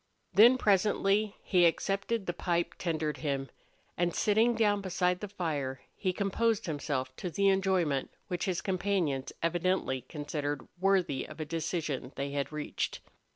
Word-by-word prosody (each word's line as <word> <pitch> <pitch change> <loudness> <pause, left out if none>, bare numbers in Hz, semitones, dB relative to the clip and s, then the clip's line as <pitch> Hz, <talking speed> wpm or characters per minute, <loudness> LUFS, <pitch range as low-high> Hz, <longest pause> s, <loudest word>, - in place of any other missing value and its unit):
Then, 240 +5 +8
presently, 205 0 +2
he 180 -3 +3
accepted 195 +5 -1
the 175 - -2
pipe 170 0 -1
tendered 155 -3 -1
him, 140 -3 -2 0.4
and, 175 -1 0
sitting 225 +3 +3
down 205 -2 +2
beside 180 -1 0
the 210 - -5
fire, 150 -9 -3
he 185 - 0
composed 210 +4 0
himself 140 -4 -2
to 180 - -3
the 200 +3 +2
enjoyment 185 -8 +1 0.2
which 180 -4 -2
his 185 -2 -1
companions 180 -8 0
evidently 170 -5 +1
considered 145 +1 -4
worthy 185 -7 +2
of 155 - -11
a 155 - -2
decision 155 -4 -3
they 140 0 -3
had 140 0 -2
reached. 150 -1 -3
175 Hz, 145 wpm, -31 LUFS, 150-195 Hz, 0.4 s, Then